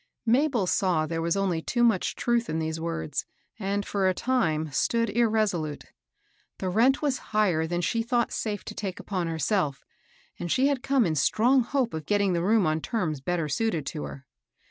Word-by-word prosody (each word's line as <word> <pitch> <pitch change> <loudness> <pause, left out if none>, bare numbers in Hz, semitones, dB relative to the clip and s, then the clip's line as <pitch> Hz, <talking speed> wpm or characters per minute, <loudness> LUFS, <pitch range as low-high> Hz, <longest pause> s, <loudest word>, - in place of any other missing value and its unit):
Mabel 245 -2 +2
saw 180 -4 +1
there 165 +1 -3
was 170 +3 0
only 185 -4 0
too 240 +8 0
much 225 -6 +2
truth 235 -1 0
in 160 - -1
tiiese 160 0 -2
words, 160 - -3 0.3
and, 200 0 -1
for 195 -2 0
a 185 - 0
time, 160 - 0
stood 230 - +1
irresolute. 215 -10 0 0.7
The 190 - -2
rent 245 +10 +3
was 280 -3 +1 0.2
higher 175 -7 +2
than 175 +1 -1
she 230 +6 0
thought 235 0 0
safe 210 -3 -3
to - - -6
take 195 -3 -5
upon 185 -4 -3
herself, 160 -2 -1 0.5
and 175 - -3
she 260 - +3
had 275 -3 -1
come 270 -3 +2
in 165 - 0
strong 235 - +3
hope 250 0 -1
of 160 -1 -5
getting 200 -2 +2
the 170 - 0
room 210 +3 +3
on 155 0 0
terms 160 - -2
better 170 +1 -1
suited 195 - -1
to 150 +1 -4
her. 140 0 -9
195 Hz, 190 wpm, -27 LUFS, 160-230 Hz, 0.7 s, rent